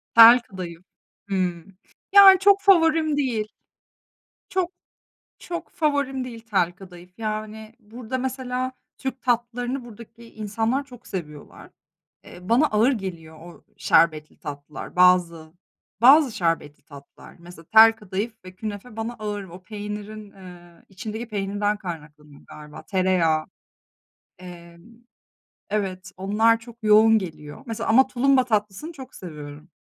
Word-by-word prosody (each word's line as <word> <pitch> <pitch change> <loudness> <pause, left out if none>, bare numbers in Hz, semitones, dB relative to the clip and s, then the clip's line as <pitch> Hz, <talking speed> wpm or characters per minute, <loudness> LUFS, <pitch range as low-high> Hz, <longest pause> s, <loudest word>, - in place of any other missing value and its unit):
Tel 230 +2 +10
kadayıf, 180 -6 -9 0.5
hıı, 180 -4 -2 0.5
yani, 390 -2 +9
çok 400 +1 +4
favorim 325 -5 +3
değil. 235 -7 -1 1.0
Çok 370 -2 -1 0.7
çok 345 -1 -7
favorim 285 -5 -1
değil 235 -2 -9
tel 180 -4 +1
kadayıf, 180 -1 -14
yani, 215 0 -5
burada, 235 +3 -6
mesela, 255 0 -3 0.3
Türk 265 -1 -5
tatlılarını 245 +1 -2
buradaki 230 0 -14
insanlar 225 +5 -2
çok 250 -3 -16
seviyorlar. 150 -6 -9 0.5
Eee, 180 +1 -13
bana 250 +7 +4
ağır 225 +2 +2
geliyor 170 -8 -7
o 170 +1 -14
şerbetli 155 -2 +2
tatlılar. 145 +1 -9
Bazı, 175 -3 +3 0.5
bazı 270 +2 +6
şerbetli 165 -4 -2
tatlılar, 140 -2 -15
mesela, 170 -1 -14
tel 220 +6 +7
kadayıf 210 +1 -5
ve 185 0 -12
künefe, 215 +3 -8
bana 225 +2 -4
ağır. 210 -2 -5
O, 180 0 -13
peynirin, 210 +1 -8
eee, 175 -2 -15
içindeki 215 +4 -7
peynirden 205 0 -2
kaynaklanıyor 150 -6 -10
galiba. 150 0 -12
Tereyağı, 180 -5 +1 1.0
emm, 170 -2 -13 0.9
evet, 190 -3 -3
onlar 215 +4 +2
çok 230 0 -14
yoğun 220 +1 +5
geliyor. 155 - -9
Mesela 230 -1 -4
ama 260 +4 +5
tulumba 265 +1 +2
tatlısını 215 - -2
çok 265 -5 -12
seviyorum, 150 -2 -10
210 Hz, 120 wpm, -23 LUFS, 175-245 Hz, 1.0 s, Tel